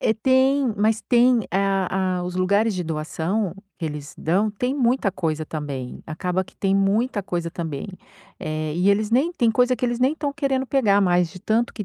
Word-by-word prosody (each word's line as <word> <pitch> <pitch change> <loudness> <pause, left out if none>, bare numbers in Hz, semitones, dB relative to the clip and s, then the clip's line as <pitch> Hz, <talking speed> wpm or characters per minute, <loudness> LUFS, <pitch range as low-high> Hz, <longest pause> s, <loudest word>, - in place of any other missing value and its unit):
eh, 220 - +2
tem, 260 +2 +2
mas 215 +2 +2
tem 245 -1 +4
a 190 -1 0
a - - -3
os 180 0 -5
lugares 200 +4 +2
de 180 -1 -3
doação 165 +5 -2 0.2
que 165 - -6
eles 150 -1 -6
dão, 190 +7 +1
tem 250 +6 -2
muita 245 -5 +1
coisa 160 -4 -2
também. 145 -5 -6
Acaba 180 +4 -2
que - - -20
tem 195 0 +1
muita 205 +3 +1
coisa 170 -3 -3
também. 160 -5 -5 0.5
Eh, 155 0 -3
e 180 +3 +2
eles 210 +1 +1
nem 275 +9 +2
tem 240 -9 +2
coisa 250 +3 +3
que 250 - -3
eles 240 -1 -1
nem 260 +4 +2
tão 290 -2 -3
querendo 275 -3 -1
pegar 215 -7 +3
mais, 180 -3 +2
de 185 - -11
tanto 225 +3 0
que 210 - -4
200 Hz, 200 wpm, -23 LUFS, 175-245 Hz, 0.5 s, tem